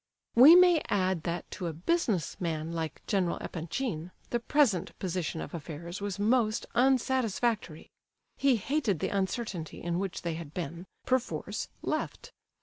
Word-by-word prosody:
We 275 +8 +10
may 355 -3 +7
add 185 -3 +1
that 170 0 -3
to 180 - -4
a 165 - -3
business 190 - 0
man 160 -2 -2
like 160 -2 -4
General 190 -4 +1
Epanchin 170 0 -4 0.2
the 240 - +1
present 235 - +2
position 175 -3 -2
of - - -7
affairs 170 +3 -6
was 200 -2 -3
most 220 +1 +2
unsatisfactory. 240 - +1 0.4
He 275 -2 +3
hated 235 - 0
the - - -1
uncertainty 190 -4 -2
in 175 0 -2
which 195 -2 -4
they 170 -1 -1
had 160 -2 -8
been, 170 +1 -5 0.2
perforce, 255 -1 -1 0.2
left. - - -3
190 Hz, 145 wpm, -30 LUFS, 170-240 Hz, 0.4 s, We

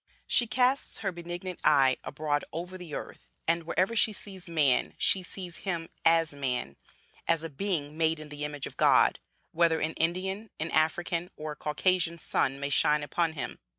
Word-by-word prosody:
She 240 - +3
casts 250 +4 +1
her 195 - +1
benignant 175 +1 -6
eye 135 -4 +5
abroad 145 0 -1
over 175 +3 -5
the 175 -4 -7
earth, - - -8 0.2
and, 165 0 +1
wherever 190 +6 +1
she 220 - +4
sees 190 -3 -8
man, 150 -6 +2
she 190 - +3
sees 180 -1 -8
him 170 -4 -3
as 165 -2 +4
man, 125 - -2 0.5
as 165 -1 +2
a 165 - -4
being 150 -2 -2
made 160 0 +2
in 155 -1 -9
the 150 0 -5
image 145 -1 -4
of - - -9
God, - - +5 0.3
whether 165 -1 +3
an 160 +1 -1
Indian, 190 +6 -1
an 160 +1 -2
African, 170 +2 +1
or 155 0 -5
a - - -6
Caucasian 170 +3 +1
sun 135 -4 0
may 140 0 -3
shine 150 +1 +3
upon 165 +2 0
him. 140 -5 -5
165 Hz, 180 wpm, -29 LUFS, 150-180 Hz, 0.5 s, eye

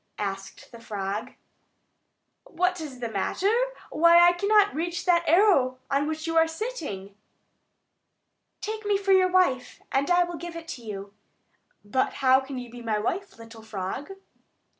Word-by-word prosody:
asked 195 +2 -6
the 235 - -11
frog. 205 -2 -4 1.1
"What 360 +1 -1
is 270 -5 -8
the 235 - -2
matter? 230 - 0 0.4
Why, 335 +2 +6
I - - +6
cannot 405 +3 +3
reach 345 +3 -3
that 345 -2 +3
arrow 325 -9 +4
on 280 +1 +1
which 315 0 -4
you 330 0 -2
are 325 0 +5
sitting." 320 - -6 1.5
"Take 435 0 -4
me 410 -1 +2
for 390 0 -1
your 375 -1 +5
wife, 360 -9 +1
and 275 +1 +1
I 355 0 +5
will 345 -1 -6
give 345 0 -8
it 335 0 -8
to 260 - -6
you." 200 -3 -7 0.7
"But 260 +6 0
how 260 -1 +4
can 270 0 -7
you 245 -2 -7
be 240 0 -10
my 225 -2 -1
wife, 355 - -3
little 230 0 -12
frog?" 220 - -5
300 Hz, 160 wpm, -26 LUFS, 230-355 Hz, 1.5 s, Why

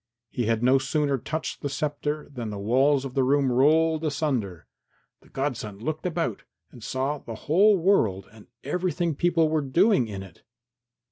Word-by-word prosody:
He 120 -3 -2
had 115 0 0
no 130 +2 +5
sooner 140 0 0
touched 160 +6 -4
the 145 - -2
sceptre 150 +2 -3
than 120 -4 -5
the 105 - -5
walls 130 +7 +2
of 130 - -6
the 135 - +1
room 135 0 +2
rolled 155 +5 +3
asunder. 130 - -2 0.6
The - - -22
godson 125 -7 -4
looked 155 - -3
about 170 - -2 0.3
and 120 - -13
saw 135 +5 -2
the 115 - -8
whole 195 +7 +5
world 115 - +1
and 110 -2 -16 0.2
everything 175 +2 -1
people 165 +1 +2
were 155 0 0
doing 170 - +3
in 100 -2 -6
it. 95 -4 -15
140 Hz, 165 wpm, -25 LUFS, 120-160 Hz, 0.6 s, no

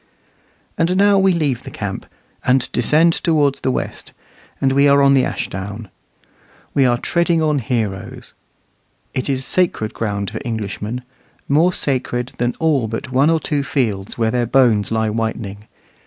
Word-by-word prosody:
And 175 +3 +2
now 200 0 +5
we 190 0 +4
leave 150 -8 0
the - - -9
camp, - - -5 0.4
and 125 0 +2
descend 155 +8 +3
towards 145 -5 +1
the - - 0
west, - - -4 0.5
and 135 0 +2
are 140 0 +5
on 140 0 +5
the 135 -2 +4
Ashdown. 100 +3 -5 0.8
We 135 - +3
are 120 -1 +2
treading 170 +5 +1
on 150 -2 +2
heroes. 110 -5 -4 0.8
It 130 - -2
is 135 -1 -1
sacred 170 -12 0
ground 100 -3 -3
for - - -5
Englishmen 110 0 -4 0.4
more 160 +6 +3
sacred 125 -5 -2
than 120 0 0
all 150 -8 +1
but 115 +4 -5
one 135 +4 +3
or 165 -1 +3
two 150 -2 -1
fields 110 -9 -2
where 110 -1 +1
their 120 -1 0
bones 115 -5 +3
lie 110 -1 0
whitening. 110 -2 -4
130 Hz, 155 wpm, -19 LUFS, 110-150 Hz, 0.8 s, now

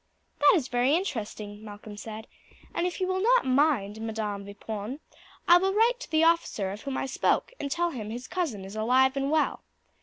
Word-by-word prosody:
"That 290 - +7
is 290 -8 0
very 245 +4 +2
interesting," 215 - -4
Malcolm 210 0 -9
said; 220 +1 -8 0.5
"and 345 - 0
if 360 - -5
you 370 - +1
will 375 0 -1
not - - +4
mind, 255 -6 +2
Madam 215 -3 -3
Vipon, 210 +5 -6 0.5
I 345 - +9
will 385 +2 0
write 465 +3 +3
to - - -9
the 315 0 +3
officer 330 - +2
of 205 +2 -7
whom 275 -2 -4
I - - -1
spoke 270 - 0
and 280 - -3
tell 345 +3 0
him 215 -7 -6
his 240 +3 -6
cousin 275 - -3
is 195 +2 -9
alive 255 +5 +3
and 275 0 -1
well. 310 +1 +1
260 Hz, 200 wpm, -27 LUFS, 215-335 Hz, 0.5 s, I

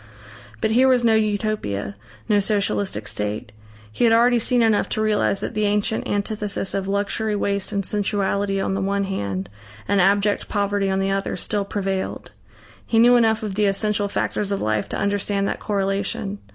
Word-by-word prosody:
But 220 - +1
here 255 +4 +5
was 255 -2 +3
no 225 - +5
Utopia, 210 - -1 0.3
no 210 -1 +3
Socialistic 200 - -1
state. 105 0 -4 0.4
He 110 - -2
had 230 - +5
already 240 +1 +4
seen 240 +1 +2
enough 220 -2 +2
to 215 - -1
realise 210 -2 +1
that - - -4
the 215 0 0
ancient 210 +2 0
antithesis 205 -1 -2
of 195 -1 -2
luxury, 205 +2 0
waste 200 -1 -1
and 200 -2 -2
sensuality 200 -1 0
on 195 - -1
the 195 - -1
one 200 +1 0
hand 100 - -3 0.4
and 200 -1 +3
abject 200 +2 +2
poverty 200 -1 0
on 190 - 0
the 195 0 0
other, 195 0 -1
still 205 -1 -2
prevailed. 195 -1 -3 0.5
He 225 - -1
knew 240 +2 +7
enough 225 -1 +3
of 210 -2 -3
the 210 +2 +1
essential 205 +1 0
factors 200 0 -2
of 200 - 0
life 110 -1 -1
to - - -3
understand 200 0 0
that - - -3
correlation. 200 0 -2
200 Hz, 180 wpm, -22 LUFS, 195-215 Hz, 0.5 s, knew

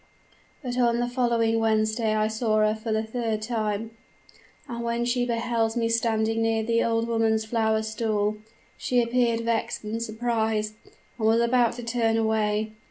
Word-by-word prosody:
But 250 -1 -3
on 235 -1 +3
the 240 - 0
following 235 -2 +1
Wednesday 220 0 +1
I 215 0 +2
saw 220 0 0
her 215 - +2
for 220 +1 -5
the 220 0 +1
third 220 -1 -3
time; 220 -1 -2 0.8
and 235 -1 -5
when 235 0 -1
she 245 0 0
beheld 230 -1 0
me 230 -1 +1
standing 225 -1 +1
near 225 0 +1
the 230 +1 +1
old 230 0 0
woman's 225 -1 +1
flower 220 -1 +1
stall, 215 -1 -1 0.4
she 250 - +1
appeared 235 -1 +1
vexed 230 -1 -1
and 220 +2 -4
surprised, 220 -2 -1 0.5
and 220 - +1
was 225 +1 +4
about 235 0 +3
to 240 - -8
turn 230 -1 +1
away. 215 -1 0
225 Hz, 165 wpm, -26 LUFS, 220-235 Hz, 0.8 s, was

